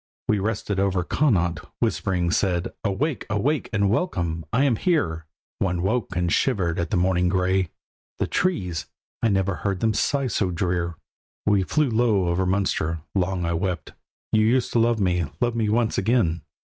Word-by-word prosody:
We 105 Hz, -, +2 dB
rested 100 Hz, -1 st, -2 dB
over 95 Hz, -2 st, +1 dB
Connaught—whispering 90 Hz, -, 0 dB
said: 90 Hz, -3 st, 0 dB
"Awake, 125 Hz, +8 st, -1 dB
awake, 125 Hz, +8 st, 0 dB
and 100 Hz, -3 st, +2 dB
welcome! 85 Hz, -, -1 dB
I 125 Hz, +4 st, +3 dB
am 130 Hz, -6 st, +2 dB
here." 80 Hz, -, 0 dB, 0.3 s
One 90 Hz, -3 st, 0 dB
woke 100 Hz, -2 st, -1 dB
and 90 Hz, -1 st, 0 dB
shivered 90 Hz, -9 st, +1 dB
at 85 Hz, -, -1 dB
the 100 Hz, -, +1 dB
morning 90 Hz, 0 st, +2 dB
grey; 95 Hz, -1 st, +1 dB, 0.5 s
"The -, -, 0 dB
trees, 90 Hz, -, -1 dB, 0.3 s
I 115 Hz, -, +3 dB
never 95 Hz, -2 st, +1 dB
heard 100 Hz, -2 st, -2 dB
them 110 Hz, +1 st, +2 dB
sigh 140 Hz, +6 st, +1 dB
so 105 Hz, -6 st, 0 dB
drear." 85 Hz, -1 st, -1 dB, 0.5 s
We 105 Hz, -2 st, +3 dB
flew 140 Hz, +7 st, +1 dB
low 110 Hz, -6 st, +2 dB
over 90 Hz, +2 st, +1 dB
Munster. 85 Hz, -4 st, 0 dB
Long 95 Hz, -2 st, 0 dB
I 85 Hz, -, 0 dB
wept: 85 Hz, -2 st, -2 dB, 0.4 s
"You 110 Hz, -, +4 dB
used 120 Hz, +3 st, +2 dB
to 120 Hz, -, +3 dB
love 115 Hz, 0 st, +2 dB
me, 90 Hz, -3 st, +1 dB
love 120 Hz, -1 st, +1 dB
me 110 Hz, -2 st, 0 dB
once 115 Hz, +1 st, +1 dB
again!" 95 Hz, -7 st, +1 dB
95 Hz, 165 wpm, -24 LUFS, 90-115 Hz, 0.5 s, You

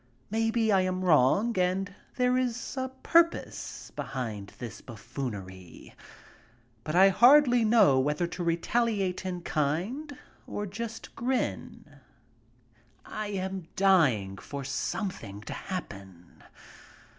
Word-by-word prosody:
Maybe 225 Hz, 0 st, +1 dB
I 195 Hz, -2 st, +4 dB
am 185 Hz, 0 st, -1 dB
wrong 180 Hz, -, +4 dB
and 190 Hz, +2 st, 0 dB, 0.2 s
there 250 Hz, 0 st, +2 dB
is 245 Hz, -1 st, -2 dB
a 260 Hz, -1 st, -2 dB
purpose 335 Hz, 0 st, +1 dB
behind 110 Hz, -7 st, -5 dB
this 120 Hz, -3 st, -8 dB
buffoonery. 105 Hz, -, -8 dB, 0.9 s
But 155 Hz, -, -3 dB
I 190 Hz, +2 st, +7 dB
hardly 245 Hz, +3 st, +6 dB
know 215 Hz, -, +5 dB
whether 150 Hz, +5 st, 0 dB
to 175 Hz, +1 st, -5 dB
retaliate 190 Hz, +2 st, 0 dB
in 180 Hz, -1 st, -4 dB
kind, 195 Hz, -, -2 dB, 0.3 s
or 205 Hz, -, -4 dB
just 220 Hz, +3 st, -7 dB
grin. 210 Hz, -, -3 dB, 1.1 s
I 215 Hz, 0 st, -5 dB
am 190 Hz, -3 st, -4 dB
dying 135 Hz, -, +3 dB
for 140 Hz, +8 st, -7 dB
something 135 Hz, -, -4 dB
to -, -, -7 dB
happen. 95 Hz, -, -8 dB
185 Hz, 110 wpm, -28 LUFS, -, 1.1 s, I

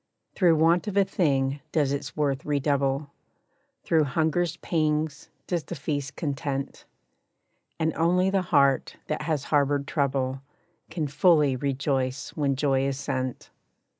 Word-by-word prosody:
Through 175 Hz, -4 st, +4 dB
want 165 Hz, +5 st, +3 dB
of 200 Hz, -1 st, -2 dB
a 200 Hz, -, +6 dB
thing 140 Hz, -7 st, 0 dB
does 145 Hz, -4 st, +1 dB
its 140 Hz, +1 st, -4 dB
worth 140 Hz, -3 st, 0 dB
redouble, 140 Hz, -1 st, 0 dB, 0.7 s
Through 160 Hz, -2 st, +3 dB
hunger's 160 Hz, +4 st, 0 dB
pangs 155 Hz, -2 st, -1 dB, 0.2 s
does 175 Hz, -3 st, -2 dB
the 175 Hz, -, -6 dB
feast 140 Hz, -1 st, -3 dB
content, 140 Hz, -2 st, -4 dB, 0.9 s
And 160 Hz, -1 st, +1 dB
only 180 Hz, +4 st, +2 dB
the 195 Hz, -1 st, +2 dB
heart 140 Hz, -6 st, +2 dB
that 155 Hz, -, -3 dB
has 150 Hz, -3 st, -1 dB
harbored 145 Hz, -1 st, +2 dB
trouble, 135 Hz, -3 st, -1 dB, 0.5 s
Can 160 Hz, -1 st, -2 dB
fully 150 Hz, -1 st, +3 dB
rejoice 135 Hz, -1 st, -1 dB
when 140 Hz, -3 st, 0 dB
joy 135 Hz, -1 st, +1 dB
is 135 Hz, 0 st, -3 dB
sent. 130 Hz, -3 st, -4 dB
145 Hz, 135 wpm, -26 LUFS, 135-160 Hz, 0.9 s, a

